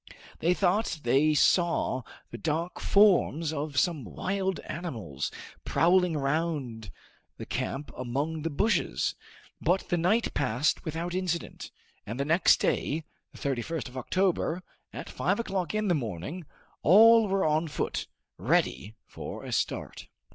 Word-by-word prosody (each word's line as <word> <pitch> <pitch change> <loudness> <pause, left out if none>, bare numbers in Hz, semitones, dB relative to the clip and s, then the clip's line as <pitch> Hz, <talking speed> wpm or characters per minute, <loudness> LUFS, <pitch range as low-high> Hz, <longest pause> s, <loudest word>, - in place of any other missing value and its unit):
They 175 +3 +2
thought 185 -3 +1
they 140 +6 +3
saw 170 -5 +2 0.3
the 120 - -6
dark 165 +3 -2
forms 175 -6 +3
of 145 -2 -4
some 155 0 +1
wild 190 - -2
animals 115 - -5 0.3
prowling 175 -1 +3
round 140 - -2 0.5
the - - -7
camp 145 +2 -4
among 140 +6 -2
the 165 - -2
bushes, 205 +10 0 0.5
but 185 +2 +1
the 175 - +1
night 195 +8 +1
passed 130 +1 0
without 165 +3 -3
incident, 180 -2 -3 0.3
and 115 +5 -6
the 140 - 0
next 165 +5 +4
day, 155 +2 0 0.3
the - - -14
31st 140 +2 -3
of 125 - -15
October, 180 +5 0 0.3
at - - -7
five - - -1
o'clock 195 -4 -2
in 215 0 0
the 180 - +3
morning, 130 - -4 0.4
all 225 +5 +7
were 195 0 +1
on 155 +2 +1
foot, 150 - -3 0.3
ready 100 - 0
for - - -8
a - - -7
start. - - -2
160 Hz, 135 wpm, -28 LUFS, 140-180 Hz, 0.5 s, all